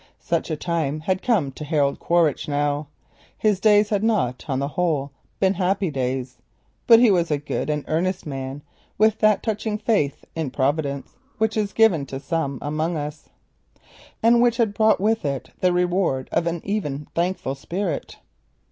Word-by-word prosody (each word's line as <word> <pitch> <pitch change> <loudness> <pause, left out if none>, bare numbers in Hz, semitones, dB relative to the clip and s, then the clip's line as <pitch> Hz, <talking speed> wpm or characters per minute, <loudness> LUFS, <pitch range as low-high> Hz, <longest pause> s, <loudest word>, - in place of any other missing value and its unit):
Such 170 0 -1
a 160 - -1
time 155 -2 -2
had 185 +3 -1
come 195 - +1
to 145 - -8
Harold 145 -2 +1
Quaritch 170 -4 +1
now. 145 0 -1 0.5
His 210 -3 +2
days 210 0 +4
had 205 -1 0
not, 200 - 0
on 135 -3 -1
the 140 +1 -1
whole, 150 -4 -1 0.3
been 190 0 +3
happy 190 -1 0
days; 130 -2 -3 0.5
but 230 - +9
he 235 -3 +6
was 175 -3 +2
a 150 - +1
good 145 +1 -3
and 150 -1 -1
earnest 180 +4 -1
man, 135 0 -5 0.3
with 220 +1 +3
that 215 -2 +3
touching 215 -1 -2
faith 205 -11 0
in 160 -4 -2
Providence 140 +1 -2 0.2
which 220 -1 +1
is 210 -2 0
given 185 -11 +3
to 135 - -5
some 140 -1 -2
among 155 +3 -1
us, 150 +1 -6 0.9
and 235 +1 +5
which 240 -1 +3
had 225 -4 +1
brought 220 +1 +3
with 220 +3 +1
it 135 -3 -3
the 185 - +3
reward 175 -6 0
of 170 - +1
an 170 -1 -2
even 150 -9 -2
thankful 170 -5 -1
spirit. 170 +4 -4
165 Hz, 170 wpm, -23 LUFS, 145-205 Hz, 0.9 s, but